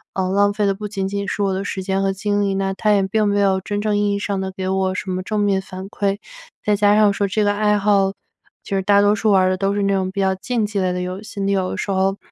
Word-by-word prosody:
嗯， 185 -1 -1
浪 205 0 +3
费 210 -1 0
的 195 - +2
不 210 +2 -7
仅 195 -2 -3
仅 200 0 -3
是 205 - -2
我 195 -1 +1
的 190 +1 -2
时 190 -1 -4
间 190 0 -1
和 195 - +1
精 205 +1 -1
力， 195 -1 0
那 195 0 -1
它 210 +2 +1
也 200 -2 +3
并 215 +2 +1
没 205 0 +1
有 190 -1 +2
真 205 +1 -3
正 210 0 0
意 205 0 +1
义 200 - -1
上 200 -2 -2
地 190 0 -3
给 185 0 -5
我 190 0 0
什 185 - -4
么 185 0 -3
正 215 +1 -2
面 200 -2 +2
反 190 0 -8
馈。 200 -1 -1 0.5
再 210 -1 +3
加 205 0 +4
上 210 -2 +4
说 200 - 0
这 210 +2 0
个 205 - +2
爱 210 0 +2
好 200 -1 +2 0.5
就 195 - -3
是 190 - +1
大 200 +1 +4
多 205 +1 +4
数 215 0 +1
玩 190 -1 +5
儿 185 - +3
的 - - +1
都 195 +1 0
是 205 0 -1
那 200 0 +2
种， 190 -1 -1
比 200 - -5
较 190 -1 +2
竞 220 +3 -1
技 205 -1 -3
类 185 -1 +1
的 180 - -2
游 185 +2 -5
戏。 215 -1 -9
你 200 0 0
有 185 -1 0
的 - - -4
时 - - -4
候 195 +1 +1
200 Hz, 330 characters per minute, -20 LUFS, 190-205 Hz, 0.5 s, 玩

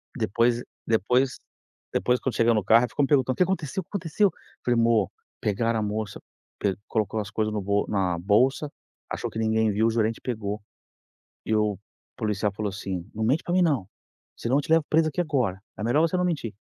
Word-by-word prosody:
Depois 120 +4 +1 0.2
depois 125 +4 +2 0.5
depois 125 0 +2
quando 130 - -2
chegou 115 0 +4
no 105 -2 +1
carro, 115 +5 +6
ela 125 - 0
ficou 145 - 0
me 135 - +2
perguntando: 130 -3 +3
"O - - -13
que - - +5
aconteceu, 185 -1 -2
aconteceu?" 195 +1 +1 0.3
falei: 120 -1 +3
"Mô, 115 -4 +3 0.3
pegaram 115 +2 +1
a - - -1
moça 105 -1 -3 0.4
pê 100 -2 +1
colocou 110 0 -1
as 105 -1 -4
coisas 110 0 -1
no 105 - -1
bol 100 +1 +1
na 95 -4 +1
bolsa, 130 - +2 0.4
achou - - -3
que 110 - -6
ninguém 110 -1 +2
viu, 110 +3 +2
o - - +2
gerente 110 0 0
pegou 105 -4 -3 0.9
e 110 - +1
o 105 -2 +1 0.4
policial 105 -3 -1
falou 105 0 -3
assim: 95 -2 -5
'Não 110 +1 -2
mente 135 +8 +2
pra 175 - -3
mim 185 0 +4
não, 140 - +1 0.5
senão 125 +4 0
eu - - +3
te - - -8
levo 165 -2 +5
presa 155 0 +4
aqui 175 - -2
agora, 125 - 0 0.2
é 105 - -3
melhor 120 +6 +3
você 165 +2 +2
não 180 - +1
mentir'" 145 - -2
115 Hz, 205 wpm, -26 LUFS, 105-135 Hz, 0.9 s, carro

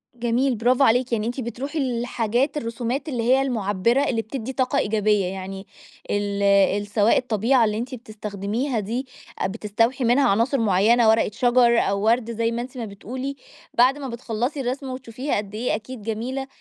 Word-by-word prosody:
جميل 245 +2 +1
برافو 245 +5 +3
عليكِ، 245 0 +3
يعني 220 -1 0
أنتِ 245 +3 -3
بتروحي 270 +6 -4
للحاجات 240 +1 0
الرسومات 240 +4 -3
اللي 240 -5 -2
هي 260 +3 +4
المعبّرة 230 0 +1
اللي 230 -3 0
بتدّي 250 +2 -6
طاقة 260 +1 0
إيجابية 210 -2 +1
يعني، 190 +1 -6 0.4
ال 200 0 -1 0.3
ال 205 0 -4
سواء 210 +1 +3
الطبيعة 235 +1 +2
اللي 210 0 -1
أنتِ 250 +3 -4
بتستخدميها 215 +2 -3
دي، 235 +6 -3 0.3
أ - - +1
بتستوحي 230 +5 0
منها 245 +4 +4
عناصر 230 +7 +2
معيّنة 220 +2 +4
ورقة 220 -1 +3
شجر، 240 -1 +4
أو 200 0 0
ورد 235 0 +2
زي 230 0 0
ما 235 +1 -2
أنتِ 255 +1 -8
ما 235 - -3
بتقولي، 255 +7 -6 0.4
بعد 255 +4 +4
ما 280 -2 -5
بتخلّصي 240 +4 -3
الرسمة 260 +1 -3
وتشوفيها 255 +1 -3
قد 205 0 -5
إيه 240 +3 0
أكيد 240 +2 -8
جميلة، 235 +5 -3
235 Hz, 170 wpm, -23 LUFS, 215-255 Hz, 0.4 s, هي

